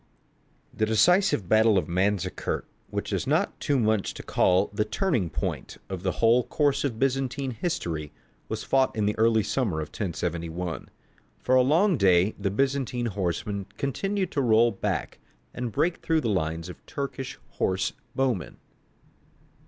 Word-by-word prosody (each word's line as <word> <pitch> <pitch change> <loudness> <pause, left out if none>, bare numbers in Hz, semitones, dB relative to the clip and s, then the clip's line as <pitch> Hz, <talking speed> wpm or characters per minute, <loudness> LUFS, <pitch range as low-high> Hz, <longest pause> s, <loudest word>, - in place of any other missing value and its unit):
_) - - -23
The 110 - +2
decisive 115 - +3
battle 110 +1 +5
of 95 - 0
Manzikert, 95 +2 -1 0.2
which - - -3
it - - +2
is - - -4
not - - +1
too 145 - +1
much 110 -4 +1
to - - -8
call 95 +2 +2
the 105 - +1
turning 110 - 0
point 75 - -4
of 95 -2 -4
the 95 -1 -1
whole 120 +2 +4
course 140 +3 +1
of 130 -6 -2
Byzantine 135 +1 0
history, 95 - -3 0.4
was - - -3
fought 135 -1 +2
in 105 -2 0
the 105 - +1
early 110 -1 +4
summer 105 -6 -1
of 75 - -4
1071. 85 -2 -4 0.5
For 130 - -1
a 130 - +7
long 165 +7 +3
day 95 -1 +4
the 100 -1 0
Byzantine 130 +2 0
horsemen 100 +1 -2
continued 190 +7 -1
to 140 - 0
roll 115 -1 +4
back 95 - -3 0.3
and 125 -1 -4
break 165 - +1
through 160 -1 +1
the 115 - -1
lines 80 -3 -1
of 90 - -11
Turkish 140 -2 -5 0.2
horse 95 0 0 0.2
bowmen. 125 - -1
110 Hz, 160 wpm, -26 LUFS, 95-135 Hz, 0.5 s, a